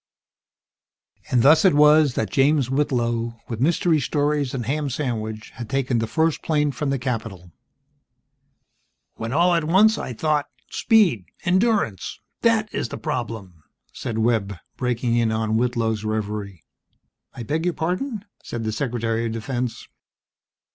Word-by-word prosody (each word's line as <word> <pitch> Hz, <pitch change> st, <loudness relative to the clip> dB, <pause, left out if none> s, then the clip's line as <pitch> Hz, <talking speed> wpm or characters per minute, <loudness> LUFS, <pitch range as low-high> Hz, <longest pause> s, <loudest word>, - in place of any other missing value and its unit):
And 120 Hz, -2 st, +3 dB
thus 155 Hz, +3 st, +6 dB
it 190 Hz, -6 st, +5 dB
was 150 Hz, -2 st, +5 dB
that 105 Hz, -4 st, -1 dB
James 135 Hz, -1 st, +2 dB
Whitlow, 120 Hz, -4 st, 0 dB
with 115 Hz, -1 st, -5 dB
mystery 165 Hz, +2 st, +2 dB
stories 145 Hz, 0 st, 0 dB
and 120 Hz, -3 st, -3 dB
ham 145 Hz, +3 st, -1 dB
sandwich, 110 Hz, -5 st, -4 dB
had 120 Hz, -2 st, -8 dB
taken 135 Hz, -3 st, 0 dB
the 115 Hz, -, -1 dB
first 160 Hz, +4 st, +1 dB
plane 150 Hz, -2 st, +1 dB
from 140 Hz, +2 st, -3 dB
the 135 Hz, -, +1 dB
Capitol... 110 Hz, -8 st, -4 dB, 0.8 s
"... -, -, -49 dB
when 115 Hz, 0 st, -4 dB
all 175 Hz, +5 st, +3 dB
at 170 Hz, -1 st, +2 dB
once, 210 Hz, +7 st, +4 dB
I 125 Hz, -, -5 dB
thought: 150 Hz, +3 st, 0 dB, 0.2 s
Speed! 195 Hz, -, +3 dB, 0.2 s
Endurance! 185 Hz, -, +1 dB, 0.2 s
That 220 Hz, -2 st, +2 dB
is -, -, -2 dB
the -, -, -6 dB
problem!" 115 Hz, -, -5 dB, 0.3 s
said 115 Hz, -, -4 dB
Webb, 110 Hz, -3 st, +1 dB, 0.2 s
breaking 120 Hz, -1 st, 0 dB
in 115 Hz, -1 st, +2 dB
on 110 Hz, 0 st, 0 dB
Whitlow's 115 Hz, -3 st, 0 dB
reverie. 105 Hz, -4 st, -4 dB, 0.7 s
"I 120 Hz, -, -6 dB
beg 155 Hz, +9 st, -2 dB
your 180 Hz, -, 0 dB
pardon?" 200 Hz, -, -2 dB, 0.2 s
said 115 Hz, -, -5 dB
the 110 Hz, -, -1 dB
Secretary 115 Hz, -1 st, -1 dB
of 110 Hz, -, -4 dB
Defense. 120 Hz, +2 st, -4 dB
125 Hz, 145 wpm, -23 LUFS, 115-155 Hz, 0.8 s, thus